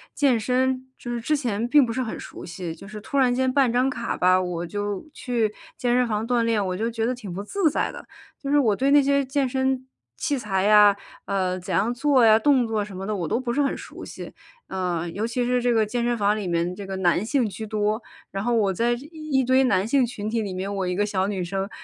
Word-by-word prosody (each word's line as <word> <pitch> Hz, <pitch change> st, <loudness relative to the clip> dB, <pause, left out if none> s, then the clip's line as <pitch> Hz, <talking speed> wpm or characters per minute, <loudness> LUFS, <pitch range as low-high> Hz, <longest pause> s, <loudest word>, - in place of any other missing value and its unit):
健 260 Hz, -6 st, +3 dB
身， 255 Hz, +3 st, 0 dB
就 240 Hz, -, -7 dB
是 235 Hz, -, -3 dB
之 300 Hz, +6 st, +1 dB
前， 235 Hz, -4 st, -1 dB
并 285 Hz, +1 st, +5 dB
不 230 Hz, -, -3 dB
是 260 Hz, -, -1 dB
很 230 Hz, -3 st, -4 dB
熟 -, -, -9 dB
悉， 170 Hz, -1 st, -6 dB
就 195 Hz, -, -12 dB
是 210 Hz, +1 st, -8 dB
突 280 Hz, +6 st, -1 dB
然 255 Hz, -2 st, +4 dB
间 260 Hz, +1 st, +1 dB
办 265 Hz, -3 st, +3 dB
张 250 Hz, +2 st, +2 dB
卡 275 Hz, -, -3 dB
吧， 185 Hz, +1 st, +4 dB
我 175 Hz, -2 st, -3 dB
就 205 Hz, -, -4 dB
去 230 Hz, -4 st, -1 dB, 0.2 s
健 245 Hz, -1 st, +1 dB
身 250 Hz, -1 st, +3 dB
房 215 Hz, 0 st, -2 dB
锻 245 Hz, -1 st, +2 dB
炼， 225 Hz, -3 st, +1 dB
我 185 Hz, -, -2 dB
就 225 Hz, +5 st, -1 dB
觉 225 Hz, -1 st, -2 dB
得 250 Hz, -, 0 dB
挺 225 Hz, -7 st, -8 dB
不 190 Hz, +3 st, -5 dB
自 340 Hz, -, +1 dB
在 300 Hz, -, -1 dB
的， -, -, -11 dB, 0.3 s
就 275 Hz, -, -4 dB
是 290 Hz, -, +4 dB
我 220 Hz, -7 st, +3 dB
对 270 Hz, +6 st, +1 dB
那 290 Hz, 0 st, +7 dB
些 280 Hz, 0 st, +2 dB
健 270 Hz, +1 st, 0 dB
身 265 Hz, 0 st, -1 dB, 0.3 s
器 285 Hz, -, -1 dB
材 195 Hz, -6 st, -1 dB
呀， 210 Hz, -1 st, +7 dB, 0.3 s
呃， 185 Hz, -2 st, -1 dB
怎 185 Hz, +1 st, -5 dB
样 205 Hz, +8 st, +2 dB
做 265 Hz, -1 st, +3 dB
呀， 220 Hz, -1 st, +7 dB
动 260 Hz, -1 st, +3 dB
作 220 Hz, -2 st, -1 dB
什 200 Hz, -2 st, -9 dB
么 190 Hz, +1 st, -5 dB
的 215 Hz, -, -1 dB
我 175 Hz, -, -2 dB
都 230 Hz, -, 0 dB
不 245 Hz, -2 st, -2 dB
是 290 Hz, -, +1 dB
很 275 Hz, -, +1 dB
熟 -, -, -10 dB
悉， -, -, -9 dB, 0.3 s
啊， 180 Hz, -3 st, -2 dB
尤 200 Hz, +6 st, -3 dB
其 240 Hz, +2 st, -1 dB
是 250 Hz, 0 st, +1 dB
这 245 Hz, 0 st, +2 dB
个 220 Hz, -1 st, +3 dB
健 235 Hz, +3 st, -2 dB
身 240 Hz, 0 st, 0 dB
房 205 Hz, 0 st, +2 dB
里 210 Hz, -, -4 dB
面 170 Hz, +1 st, 0 dB
这 200 Hz, +1 st, -7 dB
个 195 Hz, 0 st, -5 dB
男 180 Hz, +2 st, +2 dB
性 250 Hz, -1 st, +1 dB
居 220 Hz, +2 st, -6 dB
多。 215 Hz, +1 st, -1 dB, 0.3 s
然 195 Hz, 0 st, -3 dB
后 240 Hz, +2 st, +1 dB
我 205 Hz, -4 st, +2 dB
在 235 Hz, +6 st, +1 dB
一 240 Hz, -, -4 dB, 0.4 s
一 -, -, +2 dB
堆 260 Hz, +1 st, +4 dB
男 200 Hz, -5 st, +2 dB
性 265 Hz, +1 st, +3 dB
群 215 Hz, -3 st, -5 dB
体 230 Hz, 0 st, 0 dB
里 200 Hz, -3 st, -4 dB
面， 190 Hz, +2 st, -3 dB
我 195 Hz, -1 st, -1 dB
一 180 Hz, -, -1 dB
个 205 Hz, +2 st, +1 dB
小 190 Hz, -2 st, 0 dB
女 200 Hz, -2 st, -2 dB
生， 195 Hz, +2 st, -3 dB
225 Hz, 280 characters per minute, -24 LUFS, 195-250 Hz, 0.4 s, 那